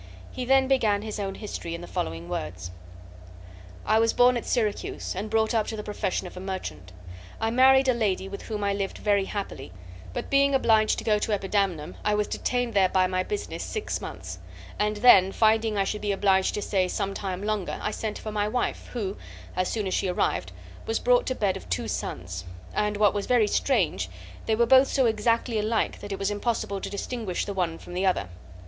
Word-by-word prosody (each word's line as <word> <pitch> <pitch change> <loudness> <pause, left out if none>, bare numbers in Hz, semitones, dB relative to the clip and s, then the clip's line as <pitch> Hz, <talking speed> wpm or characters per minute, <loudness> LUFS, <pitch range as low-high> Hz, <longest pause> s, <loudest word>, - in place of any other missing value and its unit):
He 250 - -4
then 265 +1 +4
began 215 -6 +2
his 215 -1 -5
own 195 -1 -3
history, 170 -5 -5
in 170 - -7
the - - -7
following 80 - -4
words: 90 +2 -5 1.1
"I 220 +1 +4
was 230 0 +3
born 245 0 +5
at 240 - -3
Syracuse, 220 -4 -1
and 205 +4 -4
brought 220 0 +2
up 220 -2 +1
to 225 - -3
the 210 - -5
profession 205 -3 -2
of 180 - -9
a - - -6
merchant. 185 - -6 0.5
I 225 0 0
married 265 +2 +6
a 255 - +5
lady, 205 -5 0
with 200 +1 -7
whom 210 -2 -4
I 200 0 +1
lived 200 -1 -3
very 200 -2 +2
happily, 200 - -5 0.4
but, - - -5
being 280 0 +4
obliged 220 -4 +3
to - - -4
go 210 -1 +2
to 215 - -1
Epidamnum, 195 -6 0
I 210 0 +2
was 210 0 +1
detained 245 +1 -1
there 190 -2 +4
by 185 0 +3
my 185 0 0
business 410 - -4
six 435 - -3
months, - - -7 0.4
and 210 0 +1
then, 200 -5 +7
finding 220 0 +2
I 195 - +3
should 210 +2 -3
be 205 -1 0
obliged 190 -1 +2
to 210 - -2
stay 190 -3 +1
some 195 +1 -2
time 190 -1 -4
longer, 210 -3 -2
I 210 - -2
sent 215 -1 -4
for 215 - -6
my 210 -1 0
wife, 245 +3 -2
who, 205 -5 -3 0.4
as 185 0 +1
soon 215 -3 -2
as 190 - -2
she - - +1
arrived, 180 - 0 0.4
was 450 - +1
brought - - +3
to 260 - 0
bed 200 -5 +1
of 190 - -13
two 90 - -1
sons, 90 0 -4 0.3
and 210 0 0
what 205 -2 +4
was 205 -1 -3
very 245 -3 +4
strange, 180 - +1 0.4
they 220 - +3
were 235 +2 +3
both 265 +3 +6
so 265 - +2
exactly 230 +1 +1
alike 220 +1 0
that 205 - -8
it 195 - -2
was 195 +1 -1
impossible 205 -2 -2
to - - -4
distinguish 205 -2 -3
the 200 - -4
one 175 -4 -1
from 175 - -11
the 180 +2 -1
other. 100 - 0
210 Hz, 215 wpm, -26 LUFS, 190-225 Hz, 1.1 s, then